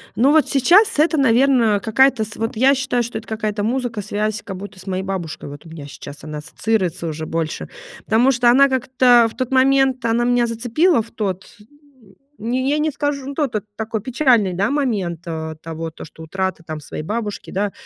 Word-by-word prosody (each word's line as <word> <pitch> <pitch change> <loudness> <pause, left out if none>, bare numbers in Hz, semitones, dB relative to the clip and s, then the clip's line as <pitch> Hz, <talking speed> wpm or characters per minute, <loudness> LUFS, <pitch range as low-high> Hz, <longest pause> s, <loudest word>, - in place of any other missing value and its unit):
Ну, 265 +5 +4
вот 315 -1 +4
сейчас 350 - +4
это, 315 +1 +3
наверно, 245 -4 +3
какая-то 235 +2 +3
с 220 +1 -8
вот 225 +1 -3
я 265 +5 +4
считаю, 255 -2 0
что 235 -1 -5
это 220 - -9
какая-то 215 -1 -2
музыка, 235 -1 -2
связь 210 +1 -2
как 195 -2 -7
будто 195 0 -9
с 185 - -14
моей 185 0 -2
бабушкой, 185 -6 -5
вот 145 +2 -11
у - - -12
меня 160 -3 -9
сейчас 145 0 -10
она 155 -1 -6
ассоциируется 180 +1 -2
уже 155 0 -4
больше. 160 -1 -3 0.4
Потому 240 +5 +3
что 245 -1 +3
она 275 +3 +6
как-то 255 -2 +4
в - - -17
тот 255 -1 -3
момент, 265 -1 +3
она 230 +1 +2
меня 245 0 +2
зацепила 245 +7 +2
в 225 - -12
тот, 190 -4 -3
м, 260 -3 -23 0.2
не 255 +4 -1
я 295 - +2
не 310 +1 +1
скажу, 285 -1 -2
ну, 280 - -5
тот 280 -5 -2
это 210 - -2
такой 220 0 -3
печальный, 240 -5 +2
да, 195 +5 0
момент, 210 - -1
э, 160 -1 -5
того, 165 0 -6
то, - - -10
что 160 +1 -13
утрата 190 +1 -3
там 155 -1 -6
своей 150 +1 -7
бабушки, 210 +3 -4
да. 200 +1 -1
225 Hz, 205 wpm, -20 LUFS, 190-260 Hz, 0.4 s, она